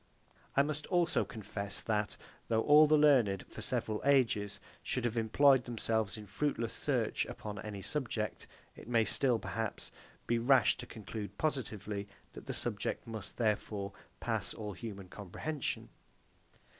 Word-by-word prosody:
I 140 - +7
must 150 0 -3
also 175 -3 +3
confess 105 -4 -3
that, 105 -2 -1 0.3
though 110 0 +2
all 150 +1 +8
the 155 +1 +5
learned, 125 -11 +4
for - - -9
several 110 -1 -1
ages, 120 -7 +3 0.2
should 130 -2 -1
have 120 -1 0
employed 125 +4 +5
themselves 110 -2 0
in 105 - -8
fruitless 115 +3 -1
search - - 0
upon 105 -1 -6
any 100 -2 -6
subject, 115 -4 -3 0.3
it - - -12
may 115 -2 +3
still, 125 +2 +2
perhaps, 110 -1 -4 0.3
be 120 0 +1
rash 130 +3 +5
to - - -7
conclude 110 -1 -7
positively 105 -8 -2 0.3
that - - -10
the - - -2
subject - - -1
must, 110 -3 -6
therefore, 105 -3 -1 0.3
pass - - -1
all 105 -2 -5
human 100 -3 -7
comprehension. 105 - -4
115 Hz, 145 wpm, -33 LUFS, 105-135 Hz, 0.3 s, all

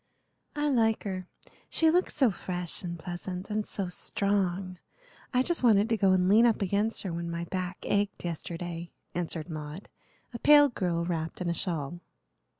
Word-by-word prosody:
"I 295 0 0
like 225 -5 +2
her, 185 -3 -4 0.4
she 320 -1 +4
looks 360 +2 +1
so 265 -6 +4
fresh 180 -1 -4
and 170 -2 -5
pleasant, 180 +3 -6
and 210 0 -1
so 195 -2 -2
strong. 185 -1 -1 0.5
I 255 0 +3
just 345 +4 +1
wanted 220 -3 +4
to 225 - +3
go 195 -3 +3
and 180 -1 +3
lean 220 +5 +6
up 220 -3 +1
against 205 +4 +1
her, 185 -4 -3
when 170 0 -3
my 170 0 -3
back 180 +1 -3
ached 205 -2 0
yesterday," 170 0 -5 0.2
answered 165 -2 -2
Maud, 155 +2 -7 0.4
a 235 - -5
pale 290 +1 +7
girl 175 -7 -1
wrapped 165 -2 -3
in 180 -2 -1
a - - 0
shawl. 170 -2 -3
185 Hz, 170 wpm, -29 LUFS, 175-215 Hz, 0.5 s, pale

